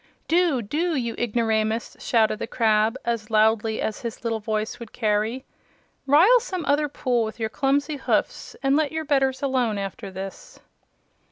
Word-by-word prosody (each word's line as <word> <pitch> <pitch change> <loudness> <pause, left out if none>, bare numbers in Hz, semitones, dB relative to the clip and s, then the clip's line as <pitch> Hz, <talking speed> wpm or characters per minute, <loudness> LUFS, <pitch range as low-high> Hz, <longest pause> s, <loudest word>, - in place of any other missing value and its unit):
"Do! 330 -7 +2
Do, 320 - -1
you 235 -4 -1
ignoramus!" 225 -1 0
shouted 220 -2 +1
the - - -4
crab, 220 0 +2
as 230 -3 -2
loudly 220 0 +2
as 215 - -2
his 235 -1 -6
little 225 -1 -1
voice 215 +1 -3
would 235 -2 -9
carry. 220 +3 -1 0.6
"Rile 355 - +6
some 375 -9 -5
other 290 +1 +2
pool 250 -4 0
with 220 +1 -6
your 220 -1 -1
clumsy 285 +3 0
hoofs, 265 - -1
and 270 +1 +3
let 300 -1 +1
your 320 0 -3
betters 270 -2 +1
alone 250 -6 +1
after 200 +2 -5
this!" 195 - -9
235 Hz, 160 wpm, -24 LUFS, 220-285 Hz, 0.6 s, Rile